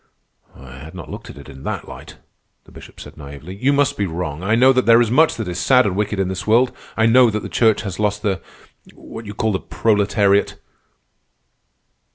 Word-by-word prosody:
"I 65 0 -13
had 80 +4 -11
not - - -9
looked - - -9
at - - -11
it - - -12
in 65 - -12
that - - -5
light," - - -11 0.5
the - - -20
Bishop - - -14
said - - -12
naively. 70 +4 -10
"You 130 +8 +1
must 140 -1 +1
be 100 - -1
wrong. 80 -2 -5
I 100 +4 +1
know 130 +3 +5
that 130 -2 0
there 115 0 +7
is 120 -2 +1
much 155 +6 +3
that 110 -4 -5
is 90 0 -4
sad 125 +2 +4
and 95 -3 -1
wicked 105 0 -2
in 95 - 0
this 95 +2 -5
world. 120 +3 +3 0.2
I 110 - +3
know 120 +1 +5
that 105 -1 -3
the - - -5
Church 110 -1 +2
has 100 -3 -6
lost 105 0 -1
the—what 105 +2 -8
you 105 - -8
call 110 0 0
the 95 - -1
proletariat." 100 +3 +1
105 Hz, 210 wpm, -19 LUFS, 90-115 Hz, 0.5 s, there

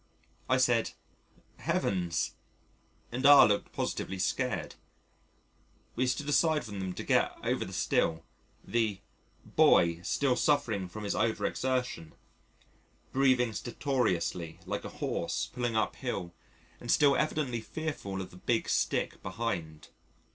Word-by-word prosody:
I 130 - +4
said, 120 -3 +2 0.6
"Heavens," 90 -3 -1 0.8
and 125 +3 -3
R 145 0 +9
looked 105 -1 0
positively 95 - -3
scared. 90 - -1 1.2
We 130 +1 +1
stood 135 +3 -1
aside 155 0 +3
for 110 - -9
them 95 -2 -4
to - - -6
get - - +2
over - - 0
the - - -8
stile, 80 0 0 0.4
the 110 -4 0 0.5
"boy" 85 0 +4
still 130 +8 +1
suffering 115 - +1
from 105 +4 -7
his 100 - -1
over 110 -2 0
exertion, 125 -11 -2 1.0
breathing 130 -3 +3
stertorously 100 - -1
like - - -4
a - - -4
horse - - -3
pulling 120 -2 -1
uphill 90 -5 -2 0.5
and 120 - -2
still 145 -2 +5
evidently 145 -6 0
fearful 110 -10 -4
of 95 - -8
the 90 - -13
big 115 +4 0
stick - - 0
behind. 95 -7 -4
115 Hz, 125 wpm, -30 LUFS, 95-130 Hz, 1.2 s, R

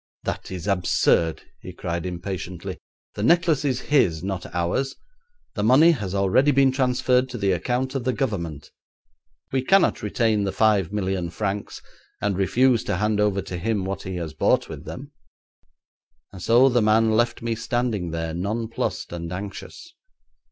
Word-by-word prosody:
'That - - -4
is 90 -2 -6
absurd,' 90 -4 +2 0.2
he - - -9
cried 85 +1 -4
impatiently. 90 -1 -5 0.3
'The - - -5
necklace 165 +3 +3
is 130 -3 0
his, 90 - +2
not 95 -1 -4
ours. 90 +11 -1 0.6
The 105 - -3
money 130 +10 +6
has 100 - -3
already 100 +9 +3
been 135 -1 +4
transferred 130 -1 +1
to 125 - -6
the 100 -3 +1
account 125 +8 -1
of 135 -3 -2
the 130 - +1
Government; 85 - -3 0.8
we 130 - +1
cannot 195 +8 +3
retain 105 0 +1
the 100 - -1
five 105 -5 +2
million 95 -4 -2
francs, 100 +3 -4 0.4
and 105 -2 0
refuse 120 +6 +2
to - - -1
hand 105 +1 0
over 100 -2 +1
to 90 -2 -6
him 105 0 -1
what 95 +1 -4
he 95 -1 -6
has 85 -4 -5
bought - - +2
with - - -9
them,' - - -8 1.2
and 95 - -10
so 120 +7 +5
the 120 -2 +3
man 110 +1 +3
left 120 +2 +1
me 115 -1 0
standing 115 -5 -2
there, 80 0 -3
nonplussed 110 +3 -3
and 85 -1 -5
anxious. 100 - -8
105 Hz, 160 wpm, -24 LUFS, 95-125 Hz, 1.2 s, money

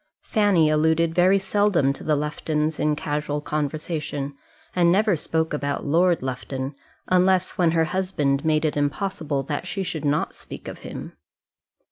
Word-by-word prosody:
Fanny 205 -7 +3
alluded 160 +2 +2
very 180 +3 +5
seldom 195 -7 +2
to - - -10
the 155 - +2
Luftons 150 +1 -1
in 150 0 +2
casual 150 0 -2
conversation, 150 -1 -3 0.4
and 175 -1 +4
never 205 +1 +3
spoke 160 +1 -1
about 140 -1 -2
Lord 170 +2 +3
Lufton, 130 +1 -4 0.4
unless 185 0 +3
when 175 -2 +2
her 165 -1 +3
husband 155 -6 0
made 155 0 +2
it 150 - 0
impossible 145 -1 -1
that 145 +5 -4
she 195 +2 -2
should 160 -4 -4
not 145 0 0
speak - - -10
of - - -7
him. - - -8
155 Hz, 150 wpm, -24 LUFS, 145-180 Hz, 0.4 s, very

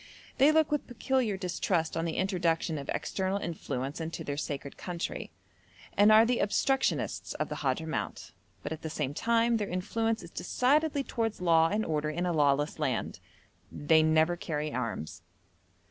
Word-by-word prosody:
They 280 +3 +7
look 315 -1 +3
with 295 - -1
peculiar 245 -3 0
distrust 180 -3 -1
on 165 - -1
the 165 - -3
introduction 170 -4 0
of 140 - -8
external 190 0 -1
influence 145 -5 -4
into 165 0 -4
their 145 - -3
sacred 140 -1 -5
country, 175 -2 -5 0.7
and 205 +1 +6
are 220 +1 +8
the 245 +1 +1
obstructionists 265 +6 0
of - - -2
the - - -4
Hadhramout, 160 -1 -3 0.3
but - - -4
at 160 - -5
the 160 - -4
same 150 -3 -2
time 230 +5 +2
their 205 -2 -3
influence 225 +4 -1
is 170 - -11
decidedly 285 +2 +1
towards 225 -4 -2
law 165 -2 +4
and 215 +1 0
order 150 -1 -1
in 175 +4 -2
a 175 - 0
lawless 145 -1 +2
land. - - -2 0.5
They 160 +2 +3
never 160 +2 +3
carry 155 -3 -3
arms. 115 -10 -4
175 Hz, 160 wpm, -30 LUFS, 155-225 Hz, 0.7 s, are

